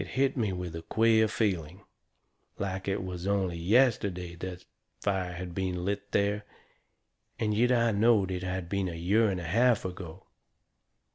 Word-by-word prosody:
It - - -7
hit 135 0 +2
me 110 -6 0
with 90 -2 -5
a 80 - -5
queer 110 +5 +3
feeling 95 -4 -2 0.7
like 95 -1 -3
it 95 -1 -1
was 90 0 -5
only 95 -4 0
yesterday 95 -3 +2
that 90 0 -7 0.3
fire 95 -3 -1
had 90 0 -6
been 90 -1 -2
lit 100 +1 -3
there. 100 +1 +1 0.9
And 105 -1 0
yet 120 +4 +3
I 115 -2 +3
knowed 105 -2 +3
it 90 -1 -3
had 90 -1 -3
been 100 0 -1
a 85 - -6
year 100 +7 +2
and 95 -2 -2
a - - -6
half 115 +7 +2
ago. 90 -1 -7
95 Hz, 165 wpm, -29 LUFS, 90-105 Hz, 0.9 s, queer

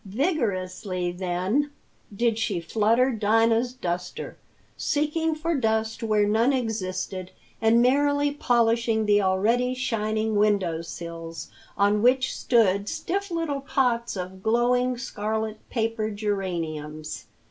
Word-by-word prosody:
Vigorously, 195 - -1
then, 185 +10 -1 0.4
did 225 +2 0
she 205 -5 0
flutter 225 +8 +2
Dinah's 225 +2 +2
duster, 180 -7 -4 0.4
seeking 315 +1 0
for 330 +2 -1
dust 220 -2 0
where 215 -2 +2
none 225 +5 +3
existed, 190 -7 -3 0.3
and 230 +1 +5
merrily 285 +2 +3
polishing 230 -4 +2
the 205 0 +4
already 225 +7 +2
shining 220 -4 -1
window 200 -6 +2
sills, 165 -1 -7 0.3
on 205 +1 +3
which 255 +2 +3
stood 205 -4 +2
stiff 400 +2 -3
little 330 -5 -2
pots 245 -6 0
of 185 +1 -6
glowing 245 +3 +2
scarlet 220 -2 -3
paper 225 -2 -1
geraniums. 165 -7 -4
220 Hz, 110 wpm, -25 LUFS, 195-250 Hz, 0.4 s, and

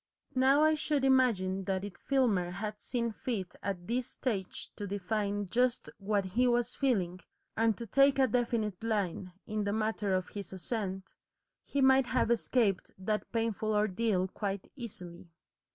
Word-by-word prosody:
Now 270 +3 +5
I 310 0 +5
should 295 -2 0
imagine 200 -8 +3
that 190 0 -1
if 205 - -7
Filmer 230 -10 +1
had 210 +3 -5
seen 235 -2 -1
fit 210 -5 -4
at 180 -3 -3
this 245 +3 -1
stage 200 -8 -4
to 205 - -5
define 205 +1 -1
just 245 +5 0
what 200 0 0
he 235 +7 +2
was 240 0 +1
feeling, 190 -10 0 0.4
and 225 -2 +2
to 235 - -5
take 275 +5 +4
a 265 - +5
definite 230 -4 -1
line 195 -5 -1
in 215 0 -2
the 200 0 -1
matter 215 -3 0
of 185 -1 -2
his 200 -2 -7
ascent, 190 -1 -4 0.5
he 280 - -1
might 265 -1 +5
have 250 -2 +1
escaped 225 -4 +1
that 210 +3 -2
painful 220 -2 0
ordeal 210 -2 +1
quite 195 0 -4
easily. 180 -9 -9
215 Hz, 155 wpm, -31 LUFS, 190-245 Hz, 0.5 s, Now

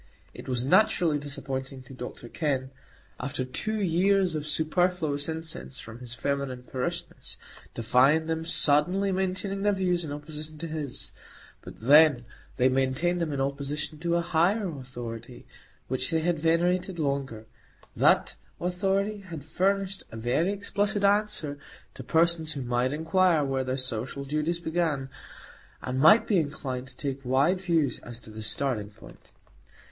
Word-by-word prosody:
It - - -9
was 125 -1 0
naturally 175 -2 +4
disappointing 135 -2 -5
to 130 - -12
Dr 125 -1 -8
Kenn, 135 -1 -1 0.5
after 130 0 -3
two 215 +12 -2
years 190 0 +3
of 155 -1 -3
superfluous 155 -1 +1
incense 160 -4 -5
from 115 +1 -10
his 120 -1 -7
feminine 140 -2 -2
parishioners, 125 0 -5 0.4
to 115 - -4
find 140 +7 +4
them 160 0 -1
suddenly 170 +5 +2
maintaining 190 +1 -2
their 205 0 +3
views 180 -2 +1
in 155 - -5
opposition 150 +1 -7
to 165 - -5
his; 155 -4 -5 0.5
but - - -12
then 145 0 +6 0.3
they 125 - +4
maintained 135 +7 +1
them 165 -2 -1
in 140 - -2
opposition 140 +3 -2
to 170 +1 0
a 170 - +2
higher 175 +5 +2
Authority, 120 -2 -8 0.4
which 130 0 0
they 160 -1 +1
had 170 -1 0
venerated 175 +3 +1
longer. 140 -7 -2 0.5
That - - +3 0.2
Authority 195 +3 0
had 165 -7 -9
furnished 195 +3 0
a 110 - -7
very 125 - +1
explicit 205 0 -1
answer 200 -8 +1 0.3
to - - -9
persons 165 -1 +2
who 140 -3 -4
might 120 +1 +1
inquire 165 +1 +3
where 135 -1 0
their 130 0 -2
social 130 +2 -3
duties 155 +4 -1
began, 160 -5 -1 0.7
and 130 +1 -3
might 155 +11 +7
be 200 -5 +3
inclined 130 -4 -3
to - - -13
take 135 -1 -4
wide 140 +9 +2
views 165 -8 +1
as 120 -1 -9
to 110 - -12
the 110 +1 -8
starting 110 -2 -1
point. 105 - -16
150 Hz, 150 wpm, -27 LUFS, 130-175 Hz, 0.7 s, might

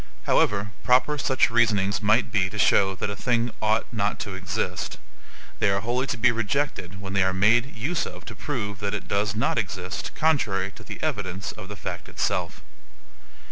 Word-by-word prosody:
However 105 0 +2
proper 130 +4 +3
such 130 -2 +2
reasonings 105 -4 +2
might 110 +3 +3
be 95 -3 +2
to 105 - -7
show 95 -2 +4
that 100 - -3
a - - -4
thing 120 +1 0
OUGHT 110 +1 +2
NOT 105 -3 -1
TO 105 -2 -4
EXIST, 90 -1 -3 0.6
they - - +3
are 100 0 +1
wholly 125 +5 -1
to - - -2
be 120 +2 +4
rejected 115 -5 -2
when 95 -1 -6
they 100 - +3
are 95 0 +2
made 115 +8 +3
use 150 +10 -1
of 90 +1 -10
to 110 - -8
prove 100 -5 -4
that 100 0 -2
it 105 - -6
does 100 0 0
not 115 +2 +1
exist 95 -3 -4
contrary 105 -12 +1
to - - -14
the - - -7
evidence 95 -1 -2
of 105 -3 -10
the 105 - -7
fact - - -6
itself. - - -2
105 Hz, 185 wpm, -25 LUFS, 95-120 Hz, 0.6 s, show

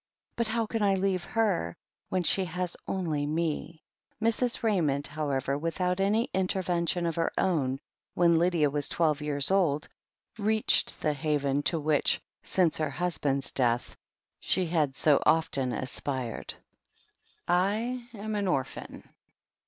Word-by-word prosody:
But 235 -1 0
how 225 +1 0
can 225 +1 -3
I 200 -1 +3
leave 190 -1 0
her, 195 - 0 0.3
when 185 -1 0
she 190 - +3 0.5
only 160 -6 -1
has - - -3
me?" 160 0 -2 0.4
Mrs. 230 +2 +1
Ra)anond, 155 -10 +1
however, 140 -3 -1
without 180 +3 -1
any 210 +4 +2
intervention 180 -2 0
of 165 - 0
her 165 - +1
own, 140 -8 +1 0.4
when 170 -2 +4
Lydia 170 -4 +2
was 145 -1 0
twelve 155 -3 +1
years 145 +1 +1
old, 165 -7 +2 0.5
reached 215 +1 +2
the 150 - +2
haven 145 -1 0
to 165 - -1
which, 150 -1 +2 0.2
since 175 -5 +1
her 155 -2 0
husband's 140 -4 0
death, 120 -2 0 0.4
she 185 - +1
had 155 -5 0
so 145 -1 +4
often 140 -5 +2
aspired. 130 -1 -3 0.9
"I 220 +8 0
am 215 +1 -5
an 205 -2 -1
orphan." 135 -7 -3
165 Hz, 135 wpm, -28 LUFS, 145-195 Hz, 0.9 s, when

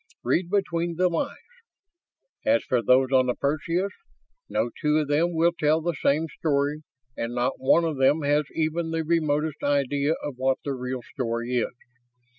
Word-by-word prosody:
Read 170 +8 +1
between 175 -4 0
the 180 +2 +3
lines. 170 - -2 1.1
As 280 +1 +3
for 125 -2 +1
those 130 +3 +3
on 130 -1 +4
the 125 - 0
Perseus, 165 +7 -1 0.6
no 120 - 0
two 150 -1 +2
of 150 -2 0
them 165 +4 +1
will 165 +2 +4
tell 155 -2 +2
the 170 +2 -1
same 150 +1 +1
story 145 -1 0 0.3
and 115 +1 -4
not 120 0 -1
one 165 +5 +4
of 160 -4 -2
them 140 +4 +3
has 145 +1 +2
even 160 +1 -1
the 165 0 -1
remotest 155 -2 0
idea 145 +1 +1
of 145 -4 -5
what 130 0 +1
the 140 - -2
real 125 0 -4
story 120 -1 -3
is. 120 - -1
150 Hz, 170 wpm, -25 LUFS, 130-165 Hz, 1.1 s, on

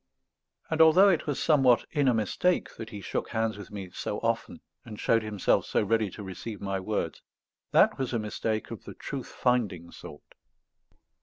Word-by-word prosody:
And 160 0 +2
although 175 +5 +7
it 170 -5 +1
was 145 - -1
somewhat 135 -6 +4
in 145 -3 +1
a 125 - +5
mistake 110 - 0
that 110 - -7
he 105 -3 -8
shook - - -3
hands 110 -1 -1
with 100 -3 -10
me 100 -3 -7
so - - -4
often - - -2 0.2
and 105 -2 -10
showed 115 0 +3
himself 105 -3 +1
so - - +1
ready 110 0 +1
to 105 - -9
receive 100 +2 -7
my 100 -1 -2
words, 95 -4 -3 0.5
that - - +4
was 130 -2 -1
a 120 - 0
mistake 110 0 -3
of - - -8
the - - -9
truth - - -6
finding 100 -9 -1
sort. 75 - -12
110 Hz, 180 wpm, -28 LUFS, 100-125 Hz, 0.5 s, although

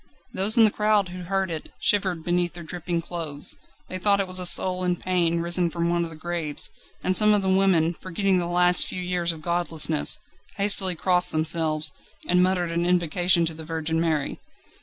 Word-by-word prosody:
Those 200 +4 +2
in 225 - +7
the 215 - +2
crowd 210 -3 +1
who 180 0 -9
heard 190 0 -2
it, 160 -2 -7
shivered 190 -5 0
beneath 175 0 -1
their 170 - -9
dripping 170 0 -4
clothes. 160 -5 -3 0.3
They 185 - -6
thought 200 +1 +2
it 195 - 0
was 185 0 -1
a 180 - +2
soul 185 +1 +3
in 180 -1 0
pain 170 -2 -1
risen 175 0 +3
from 170 +1 -2
one 175 0 0
of 170 - -5
the 160 - -10
graves, 160 -2 -3 0.3
and 185 - 0
some 210 +1 +6
of 200 - 0
the 190 - 0
women, 175 -4 +2
forgetting 185 +1 -1
the 175 - -3
last 180 0 +3
few - - -6
years 180 -1 -1
of 160 -2 -10
godlessness, 165 -3 +2 0.4
hastily 195 -2 +3
crossed 180 +1 +2
themselves, 155 -1 0 0.4
and 180 0 +3
muttered 180 -2 0
an 170 +1 -1
invocation 175 0 +2
to 165 - -4
the 160 0 -10
Virgin 160 0 -3
Mary. 155 -4 -2
175 Hz, 200 wpm, -24 LUFS, 165-185 Hz, 0.4 s, in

